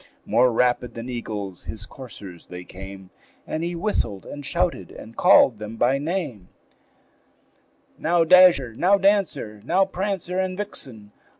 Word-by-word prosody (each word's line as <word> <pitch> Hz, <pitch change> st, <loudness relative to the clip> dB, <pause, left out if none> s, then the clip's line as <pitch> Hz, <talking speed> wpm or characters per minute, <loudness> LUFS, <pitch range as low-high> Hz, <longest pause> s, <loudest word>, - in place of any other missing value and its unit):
More 125 Hz, +1 st, +3 dB
rapid 125 Hz, +1 st, +1 dB
than 115 Hz, +2 st, -6 dB
eagles 105 Hz, -6 st, -6 dB
his 105 Hz, -1 st, -6 dB
coursers 105 Hz, -10 st, -11 dB
they 90 Hz, 0 st, -8 dB
came, 95 Hz, +1 st, -11 dB, 0.3 s
And 155 Hz, -, -3 dB
he 175 Hz, +1 st, -3 dB
whistled 140 Hz, -, -2 dB
and 145 Hz, -, -8 dB
shouted, 175 Hz, +4 st, -1 dB
and 115 Hz, +1 st, -12 dB
called 115 Hz, -5 st, +5 dB
them 105 Hz, +1 st, -7 dB
by 125 Hz, +4 st, +2 dB
name; 145 Hz, -, -4 dB, 1.5 s
"Now, 170 Hz, +1 st, +2 dB
Dasher! 170 Hz, -8 st, +6 dB
now, 185 Hz, -, +3 dB
Dancer! 195 Hz, -, +1 dB
now, 185 Hz, -, +2 dB
Prancer 190 Hz, -1 st, -3 dB
and 185 Hz, -1 st, -2 dB
Vixen! 125 Hz, -, -5 dB
130 Hz, 135 wpm, -23 LUFS, -, 1.5 s, Dasher